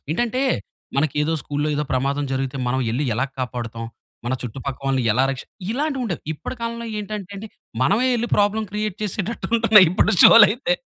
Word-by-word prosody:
ఏంటంటే, 240 +7 -1 0.5
మనకేదో 150 +2 +1
స్కూల్‌లో 145 +1 -2
ఏదో 150 - -1
ప్రమాదం 140 +2 0
జరిగితే 135 0 -2
మనం 130 +2 0
యెళ్లి 130 +6 -1
యెలా 125 +5 0 0.2
కాపాడుతాం, 115 -2 -5 0.4
మన 125 - -1
చుట్టుపక్కల 130 +3 -6
వాళ్ళని 135 -2 +1
యెలా 125 +5 +2
రక్షి 135 -1 -6 0.3
ఇలాంటివుండేవి. 260 - -2
ఇప్పటి 160 - -7
కాలంలో 235 0 -4
ఏంటంటే 205 -2 -6
అండి, 210 +2 -8 0.3
మనమే 205 - +2
ఎళ్లి 235 0 -2
ప్రాబ్లమ్ 210 +1 +1
క్రియేట్ 210 -2 -3
చేసేటట్టు 210 +2 -3
ఉంటున్నాయి 220 -4 +7
ఇప్పుడు - - +2
షోలైతే. 230 - +7
175 Hz, 155 wpm, -22 LUFS, 135-220 Hz, 0.5 s, ఉంటున్నాయి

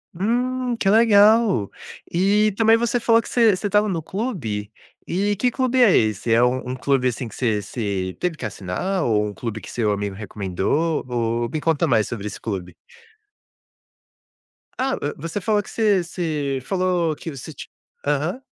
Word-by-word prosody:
Hum, 245 +5 0
que 195 - +2
legal! 215 - +5 0.4
E 205 +4 +3
também 225 +2 +4
você 235 +1 0
falou 230 0 +4
que - - -10
você 225 -5 +4
você 205 - -3
estava 210 +1 +2
no 175 -5 -2
clube, 150 - -4 0.4
e 205 +3 0
que 245 +5 +1
clube 255 0 +1
é 205 -6 +5
esse? 110 +1 +1
É 115 +2 +5
um 125 0 0
um - - -3
clube, 130 0 +1
assim, 125 +1 -5
que 110 - -11
você 110 -5 0
você 100 -3 -4
teve 180 -3 -1
que 130 - -11
assinar 105 - -3
ou 105 -4 +2
um 105 - -6
clube 115 -2 -5
que - - -10
seu 110 -3 0
amigo 100 -1 -3
recomendou? 105 - -2
Ou 120 -1 -1
me 155 -1 -3
conta 165 0 +1
mais 115 -7 +2
sobre 105 -3 -6
esse 105 - -6
clube. 95 -5 -5 2.0
Ah, 265 +1 0
hã, 145 - -2
você 165 +6 -4
falou 210 +1 +1
que - - -12
você 205 -5 +2
você 155 -6 -2
falou 180 -2 0
que 165 - -7
você 140 +3 -9
ti - - -10 0.4
aham. 150 - -1
160 Hz, 180 wpm, -22 LUFS, -, 2.0 s, legal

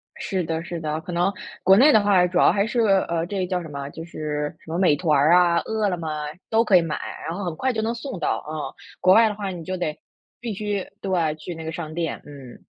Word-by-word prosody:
是 190 -2 -2
的 160 0 -3
是 170 0 -5
的， 155 -1 -2
可 180 - -8
能 175 +3 +1 0.3
国 190 +1 +6
内 280 +7 +7
的 215 - +6
话 200 -3 +4
主 180 0 -2
要 - - +6
还 200 0 +1
是， 235 +2 -1
呃， 190 -5 +2
这 195 +1 -3
个 185 - -1
叫 180 0 -1
什 165 - -8
么， 140 -1 -6
就 165 - -8
是 150 -2 -4
什 160 - -11
么 170 - -1
美 175 -6 +4
团 150 -2 +2
啊， 175 -1 +5
饿 220 -1 0
了 180 - -2
么， 165 -1 -5 0.4
都 225 +1 +3
可 200 - +4
以 175 - +4
买， 165 -2 -3 0.3
然 165 +2 -3
后 200 - -4
很 170 - -3
快 260 +10 0
就 220 - -1
能 225 +1 -1
送 235 -4 -6
到， - - -1
嗯， 155 -1 -4 0.3
国 185 - +5
外 225 0 +6
的 210 - -4
话 200 -2 -4
你 175 -3 -7
就 185 +1 -4
得 155 -4 -3 0.4
必 230 -3 -4
须 205 -1 -3
对， 170 -5 0
去 160 +3 -7
那 160 - -7
个 160 - -3
商 160 -1 -6
店， 165 -1 -3
嗯。 140 -4 -12
175 Hz, 275 characters per minute, -23 LUFS, 160-200 Hz, 0.4 s, 内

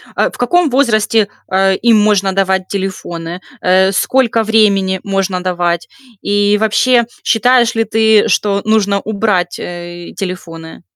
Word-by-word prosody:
а, - - +1
в - - -13
каком 330 +7 +1
возрасте, 225 -5 +1 0.2
а, 190 0 +2
им 230 +3 +3
можно 200 -2 +1
давать 190 -1 0
телефоны? 180 -3 -5 0.2
Э, 190 +1 +3
сколько 230 +3 +1
времени 200 -4 +2
можно 195 -2 -2
давать 175 -2 -1 0.4
и 205 0 +1
вообще, 235 +3 +2 0.2
считаешь 240 0 +2
ли 225 - +1
ты, 220 -1 +2
что 200 -1 0
нужно 205 -2 +1
убрать, 200 -5 -1
э, 175 0 -8
телефоны? 165 -4 -7
200 Hz, 130 wpm, -14 LUFS, 185-220 Hz, 0.4 s, им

